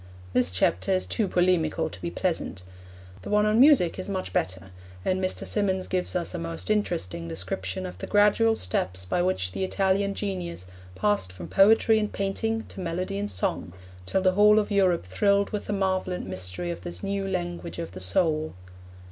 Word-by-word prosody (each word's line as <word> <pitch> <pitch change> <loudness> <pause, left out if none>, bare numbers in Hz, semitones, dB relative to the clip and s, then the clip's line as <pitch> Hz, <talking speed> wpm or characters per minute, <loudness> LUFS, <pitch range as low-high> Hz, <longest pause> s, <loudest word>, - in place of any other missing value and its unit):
This 125 -4 +3
chapter 90 - +1
is 185 - +1
too 220 -4 0
polemical 175 -3 +1
to 90 +1 -10
be 85 - -2
pleasant. 90 +1 -2 0.6
The - - -8
one 210 0 +3
on 215 +2 +3
music 260 - +5
is 185 - -5
much 190 -2 -3
better, 95 0 -2 0.3
and 185 0 0
Mr. 185 - -1
Symonds 190 -3 0
gives 180 -1 -1
us 175 0 -1
a 175 - -3
most 165 +4 -4
interesting 165 - -1
description 95 +2 -4
of 90 0 -8
the - - -5
gradual 210 +2 +4
steps 90 - -2
by 135 - 0
which 175 - 0
the 100 - -3
Italian 195 +1 +1
genius 180 - -4 0.3
passed 95 -1 0
from 90 -2 -9
poetry 220 +2 +5
and 210 -1 -2
painting 225 +3 -2
to - - -9
melody 185 +3 -3
and 205 0 -2
song, 185 - -2 0.3
till 190 - +1
the 185 - +5
whole 210 +2 +6
of 210 0 +1
Europe 185 - +2
thrilled 200 - +2
with 210 - -3
the - - -4
marvel 190 -2 0
and 180 - -4
mystery 90 -1 -4
of 85 0 -6
this 85 0 -6
new 195 0 -2
language 175 -2 -4
of 170 -1 -5
the 95 - -8
soul. 155 - +1
180 Hz, 190 wpm, -26 LUFS, -, 0.6 s, whole